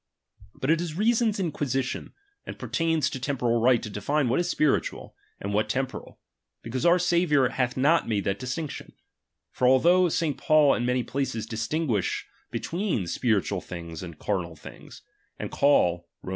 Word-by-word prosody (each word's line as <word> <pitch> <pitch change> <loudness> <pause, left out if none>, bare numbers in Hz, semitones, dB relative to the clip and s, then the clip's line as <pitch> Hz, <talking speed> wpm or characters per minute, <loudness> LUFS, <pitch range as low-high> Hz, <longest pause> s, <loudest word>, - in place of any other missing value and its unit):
But 135 - 0
it 165 +1 +2
is 165 -3 -4
reason's 220 +1 +2
inquisition, 135 -7 -2 0.3
and - - -8
pertains 165 -4 0
to 135 - -5
temporal 125 -3 0
right 125 -1 +4
to - - -4
define 125 +7 -1
what 130 - +2
is 175 0 0
spiritual, 155 -4 0 0.2
and 100 +1 -4
what 105 +1 +1
temporal; 130 +3 -3 0.5
because 130 +6 -1
our 175 +1 +6
Sa 175 -1 +1
viour 150 -7 +3
hath 125 -1 -1
not 150 +6 +3
made 105 -3 0
that 95 - -1
distinction, 130 +4 -5 0.6
For 125 - +1
although 175 +8 +5
St. 155 -3 -1
Paul 155 -2 +5
in 120 - -1
many 125 0 +1
places 130 -5 -3
distinguish 115 - -1 0.2
between 175 - -2
spiri 105 +3 +1
tual 100 -3 -3
things 85 -2 -7
and 85 -3 -8
carnal 90 -4 -2
things; - - -13 0.3
and - - -5
call 90 -12 +3 0.2
(Rom. - - -7
130 Hz, 165 wpm, -26 LUFS, 110-160 Hz, 0.6 s, our